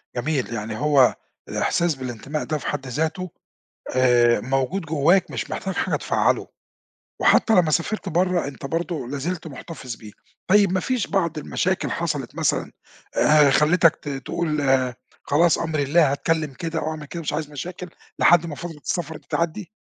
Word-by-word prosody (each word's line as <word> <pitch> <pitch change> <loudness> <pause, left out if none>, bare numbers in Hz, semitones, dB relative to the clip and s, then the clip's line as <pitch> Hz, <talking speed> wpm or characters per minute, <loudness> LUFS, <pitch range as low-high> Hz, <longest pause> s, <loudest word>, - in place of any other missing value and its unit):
جميل 130 -1 -1
يعني 105 -1 -4
هو 145 -3 +4 0.3
الإحساس 170 -3 +1
بالانتماء 130 +3 -5
ده 155 - -2
في - - -7
حد 140 -2 -3
ذاته، 160 +7 -2 0.7
آآ، 120 -2 +4
موجود 135 +9 -1
جواك 160 +5 +2
مش - - -4
محتاج - - -3
حاجة - - 0
تفعّله، - - +1 0.7
وحتّى 225 - +4
لمّا 175 -6 +4
سافرت 190 +5 -1
برّا 180 -1 +1
أنت 135 -1 -8
برضو 165 -2 -3
لا 140 +3 -4
زلت 165 +4 -4
مُحتفظ 135 -4 -8
بيه، 110 -1 -12 0.4
طيّب 200 -1 +5
ما 185 - +2
فيش 250 +1 -1
بعض 170 -5 0
المشاكل 150 - -1
حصلت - - -3
مثلًا، - - 0 0.5
آآ، 150 -1 +6
خلتك 165 +3 +4
ت 145 - -8
تقول 150 +3 -2
آآ، 130 -3 +2 0.3
خلاص 165 +3 +3
أمري 155 -3 -1
لله 150 0 +4
هاتكلّم 155 0 -1
كده 165 +4 -3
أو 155 - -2
أعمل 155 -1 -6
كده 170 +4 -6
مش 155 - -3
عايز 150 -1 -3
مشاكل، 180 +5 -7 0.3
لحد 175 -1 +5
ما 155 -3 -5
فترة 170 -1 -7
السفر 160 -2 -3
دي - - -23
تعدي؟ 170 +3 -2
155 Hz, 165 wpm, -23 LUFS, 135-170 Hz, 0.7 s, آآ